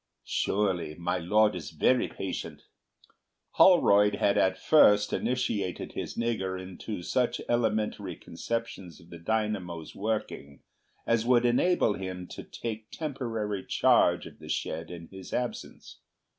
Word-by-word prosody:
"Surely 95 -6 -1
my 90 +2 -2
Lord 105 +5 +3
is 90 - -6
very 120 +10 +2
patient." 95 - -6 0.9
Holroyd 105 - +5
had 100 0 +2
at 95 0 +2
first 105 -6 +5
initiated 110 -7 -1
his - - -5
"nigger" 95 -6 -1
into 95 +1 -7
such 125 +6 0
elementary 105 -5 0
conceptions 95 -1 -5
of 85 - -18
the 85 - -9
dynamo's 95 -4 -2
working 105 -9 -4 0.4
as 115 -1 +2
would 125 -1 +4
enable 125 - +3
him 95 -2 -6
to - - -7
take 110 -2 -6
temporary 115 - -3
charge - - +3
of - - -12
the - - -11
shed 80 +1 -3
in 85 -1 -8
his 95 -1 -10
absence. 125 -1 -5
105 Hz, 130 wpm, -28 LUFS, 90-115 Hz, 0.9 s, Holroyd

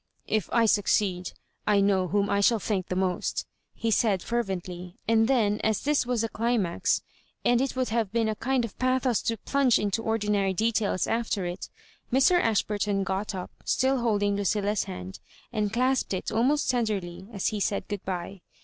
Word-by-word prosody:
" - - -40
If 210 - -4
I 235 -1 +4
succeed, 200 -3 +1 0.3
I 205 -1 +4
know 195 -2 +2
whom 200 +2 +1
I 200 0 +1
shall 230 +3 +4
thank 200 -3 -2
the 185 - -3
most," 185 -1 -1 0.3
he 230 - -1
said, 205 -5 +2
fervently; 185 -6 -3
and 225 0 +4
then, 215 -5 +2
as 220 -2 +1
this 290 -3 +1
was 245 -3 0
a 225 - -1
dimax, 220 -6 0 0.4
and 245 0 +4
it 270 -1 -1
would 255 -1 0
have 225 -3 0
been 230 0 +1
a 220 - 0
kind 255 +2 0
of 225 - -9
bathos 255 -2 +1
to 230 - -1
plunge 270 +2 +2
into 205 +2 -1
ordinary 210 -3 0
details 215 -2 +1
after 225 -4 -1
it, 175 +1 -5 0.4
Mr. 275 +8 +4
Ashburton 205 -2 0
got 195 +2 -2
up, 180 -1 -6
still 265 0 +1
holding 205 -4 +1
Ludlla's 205 +1 0
hand, 90 0 -7 0.3
and 210 -2 0
clasped 255 -2 +1
it 185 - -4
almost 255 +7 +2
tenderly 200 -7 -2
as 200 -4 -1
he 210 - -3
said 200 0 -1
good 205 -2 -4
bye. 185 0 -5
210 Hz, 180 wpm, -27 LUFS, 195-235 Hz, 0.4 s, I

